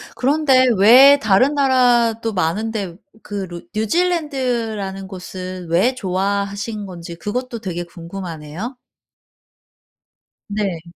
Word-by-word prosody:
그런데 270 -1 +3
왜 255 +8 +8
다른 220 +7 +3
나라도 240 -4 +2
많은데 195 +1 -2 0.3
그 200 -2 -4
루 175 -1 -8
뉴질랜드라는 235 - -1
곳을 185 -1 -7
왜 190 +10 +2
좋아하신 200 +1 -2
건지 170 -2 -8
그것도 235 +6 -4
되게 180 -5 -4
궁금하네요. 170 - -7 1.7
네. 200 -5 -2
205 Hz, 220 characters per minute, -19 LUFS, 185-250 Hz, 1.7 s, 왜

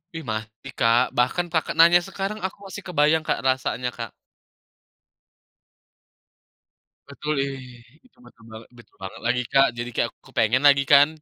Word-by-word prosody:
Ih, 165 - -6
masih 110 +4 -7
Kak. 115 +1 +4 0.2
Bahkan, 125 +8 +1
Kakak 160 - -1
nanya 170 +1 +7
sekarang, 195 +2 -5
aku 190 - -5
masih 205 +1 -9
kebayang 155 -1 +2
Kak, - - 0
rasanya 130 -1 -1
Kak. 115 -2 -6 3.0
Betul, 150 - -4
ih, 130 -3 -7 0.2
itu 255 - -27
betul 115 - -19
banget 110 +1 -12
betul 120 - -19
banget 95 0 -8
lagi, 125 +1 +1
Kak. 135 0 +5
Jadi, 120 0 -4
kayak, - - +1
aku - - -83
kepengen 120 +5 +1
lagi 140 -1 +5
kan. 140 +1 +6
135 Hz, 150 wpm, -23 LUFS, 120-160 Hz, 3.0 s, nanya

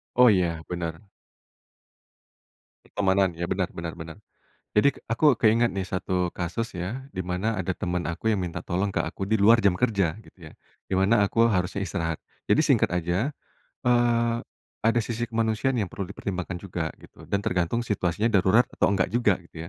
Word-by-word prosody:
Oh 125 -1 +7
ya, 85 -5 +1
bener. 85 +1 -4 1.8
Pertemanan 95 -2 +1
iya 85 +1 -4
bener 95 -2 -1
bener 85 -1 -6
bener, 80 +3 -9 0.6
jadi 125 +7 +5 0.2
aku 125 +3 +3
keingat 115 +1 +4
nih 95 -1 -3
satu 90 -1 -2
kasus 95 +6 -3
ya 105 +10 -5
dimana 95 +4 -2
ada 95 -1 -2
temen 90 0 -2
aku 85 - -6
yang 95 - -1
minta 85 -2 -4
tolong 95 +3 -1
ke - - -2
aku - - -3
di 110 +2 +1
luar 115 +3 +6
jam 95 -3 +3
kerja 100 -7 +1
gitu 85 -7 -14
ya, - - -16 0.4
dimana 95 +3 +3
aku 115 +3 +3
harusnya 95 -2 0
istirahat. 80 -1 -2 0.3
Jadi - - +5
singkat - - +3
aja, 90 - 0 0.5
eee, 120 -1 +3 0.4
ada 115 +1 +2
sisi 120 -1 -3
kemanusiaan 115 +3 0
yang 100 -6 -2
perlu 95 -2 -5
dipertimbangkan 95 -2 -4
juga 85 -3 -4
gitu - - -16
dan 100 0 -1
tergantung 90 +7 0
situasinya 105 +2 0
darurat 100 +5 +5
atau - - +2
enggak 95 0 0
juga 115 -6 +3
gitu 85 0 -9
95 Hz, 165 wpm, -26 LUFS, 90-115 Hz, 1.8 s, Oh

